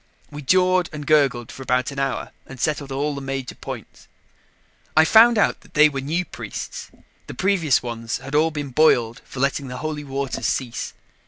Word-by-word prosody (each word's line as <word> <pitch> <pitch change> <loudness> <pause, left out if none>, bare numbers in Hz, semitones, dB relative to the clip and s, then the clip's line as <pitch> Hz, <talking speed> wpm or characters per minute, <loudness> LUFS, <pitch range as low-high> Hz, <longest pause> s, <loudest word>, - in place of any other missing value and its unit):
We 150 0 -7
jawed 185 +4 +3
and 150 -2 -7
gurgled 135 -6 +2
for - - -10
about 125 +1 0
an 140 - -6
hour 135 -2 -2 0.2
and 135 - -11
settled 145 0 -1
all 145 +2 -1
the 140 - -6
major 135 -2 -4
points. - - -9 0.9
I 160 - +7
found 230 +5 +7
out 205 - +2
that - - -22
they 150 0 +7
were 135 -2 -4
new 165 +6 -1
priests; - - -7 0.4
the - - -8
previous 180 -10 +2
ones 115 -1 -4
had 135 +2 -10
all 155 +2 +4
been 145 -3 -5
boiled 120 -5 +3
for 130 - -9
letting 140 +1 0
the 125 0 -6
Holy 155 -1 -4
Waters 135 -1 -3
cease. 120 -3 -3
140 Hz, 185 wpm, -22 LUFS, 130-155 Hz, 0.9 s, I